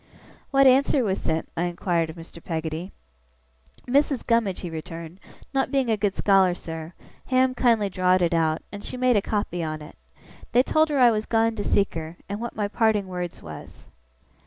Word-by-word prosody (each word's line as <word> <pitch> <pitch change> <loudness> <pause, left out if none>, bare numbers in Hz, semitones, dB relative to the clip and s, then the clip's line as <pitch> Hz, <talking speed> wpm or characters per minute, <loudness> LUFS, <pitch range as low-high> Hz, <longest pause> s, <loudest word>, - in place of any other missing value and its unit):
'What 275 0 +4
answer 265 +1 +4
was 195 -3 -1
sent?' 160 0 -1
I 170 - 0
inquired 170 -1 -1
of 160 - -8
Mr. 170 0 -12
Peggotty. 160 +2 -4 0.9
'Missis 275 +1 +1
Gummidge,' 230 -6 +1
he 175 - -5
returned, 165 +2 -8 0.3
'not 270 0 +1
being 265 -4 +1
a - - +3
good 205 -2 -1
scholar, 190 -3 +4
sir, 160 -1 -7 0.3
Ham 255 0 +3
kindly 230 -5 +2
drawed 185 -1 +2
it 170 - +1
out, 160 -1 +1
and 205 0 -8
she - - -6
made 250 -1 +3
a 205 - +3
copy 200 -4 -2
on 155 -1 -3
it. 150 - -12 0.6
They 245 +2 +5
told 310 +3 +2
her 290 - 0
I 245 -3 +6
was 215 -1 -2
gone 225 0 +2
to 205 - -3
seek 200 -1 +1
her, 160 +1 -6
and 205 +1 -4
what 235 - -5
my 210 -2 -1
parting 215 -2 +1
words 180 -2 -5
was. 80 -1 -11
200 Hz, 190 wpm, -25 LUFS, 170-235 Hz, 0.9 s, I